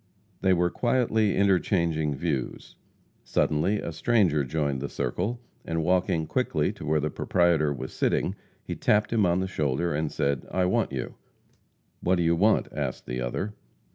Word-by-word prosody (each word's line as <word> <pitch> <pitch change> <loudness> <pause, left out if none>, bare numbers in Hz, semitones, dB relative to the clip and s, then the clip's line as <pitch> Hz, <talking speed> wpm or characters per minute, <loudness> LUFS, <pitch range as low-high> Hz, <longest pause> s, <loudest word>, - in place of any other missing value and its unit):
They 95 - +3
were 90 -1 +2
quietly 115 -4 +1
interchanging 85 -6 +2
views. 70 -4 -3 0.5
Suddenly 85 +8 +1
a - - -4
stranger 85 -5 +2
joined 70 -1 -1
the 70 - -3
circle, 100 - -2 0.2
and, 80 -1 -2
walking 90 -2 +1
quickly - - 0
to - - -9
where 75 0 +2
the 75 +1 -2
proprietor 85 -4 +2
was 65 -2 -5
sitting, - - 0 0.3
he - - -5
tapped 105 +2 +2
him 105 -5 +3
on 85 +2 +2
the 95 - -1
shoulder 80 -1 -1
and 75 0 -1
said: 70 -2 -1
"I 95 -1 +1
want 110 0 +1
you." 65 -2 -5 0.8
"What 90 +2 +2
do 85 - +1
you 85 0 +3
want?" 105 +6 +3
asked - - -3
the 60 0 -4
other. 95 - -3
85 Hz, 165 wpm, -27 LUFS, 75-95 Hz, 0.8 s, They